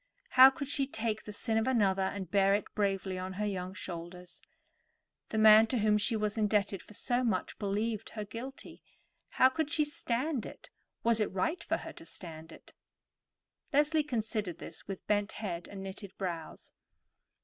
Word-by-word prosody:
How 260 +1 +9
could 275 +1 -5
she 275 -1 0
take 220 -4 -2
the 210 - -6
sin 220 +2 0
of 225 - -1
another 200 -7 +3
and 190 -2 -3
bear 195 -1 +4
it 205 - -1
bravely 195 -2 -1
on 185 +1 -4
her 210 +3 -2
young 190 -2 -3
shoulders? 175 -1 -7 0.9
The 220 - -3
man 215 +1 +8
to 250 - -1
whom 210 -1 +3
she 215 +2 +1
was 210 0 -1
indebted 205 -2 +1
for 210 - -13
so 245 +3 0
much 210 -7 -1
believed 210 +2 -1
her 210 - -3
guilty. 250 +6 -8 0.5
How 260 - +5
could 285 +3 -1
she 300 0 +2
stand 290 -3 -2
it? - - -13 0.3
Was 230 -1 +4
it 210 - 0
right 195 - -1
for - - 0
her - - -8
to 340 -1 -12
stand 160 -2 -9
it? - - -15 1.0
Leslie 300 +2 +3
considered 220 - -2
this 165 - -9
with 195 -2 -6
bent 205 0 +1
head 180 -5 -5
and 195 -1 -8
knitted 195 0 -8
brows. 170 -4 -5
210 Hz, 175 wpm, -32 LUFS, 190-235 Hz, 1.0 s, How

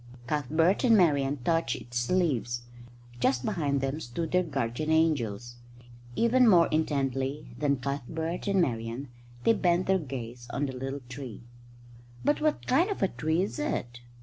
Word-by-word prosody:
Cuthbert 155 +7 +1
and 230 -3 +6
Marian 145 -6 +3
touched 165 -4 +1
its 120 0 -4
leaves. 130 -10 0 0.6
Just 125 0 +1
behind 145 -9 0
them 135 +3 -2
stood 160 +4 -4
their 180 - +4
guardian 140 -2 -2
angels. 120 -8 +1 0.6
Even 245 +2 +4
more 175 -4 +6
intently 140 -2 -1
than 140 -2 +2
Cuthbert 150 +7 -4
and 195 -1 +2
Marian 120 -2 -1 0.3
they 230 - +5
bent 180 -3 +2
their 190 0 +3
gaze 125 -5 -7
on 145 - -1
the 135 - -4
little 135 +2 -4
tree. 125 -3 -8 0.8
"But 295 - +2
what 305 -1 0
kind 330 +10 +3
of 400 - -2
a 195 - +3
tree 160 +3 0
is 205 - -4
it?" 120 - -3
145 Hz, 150 wpm, -28 LUFS, 125-175 Hz, 0.8 s, and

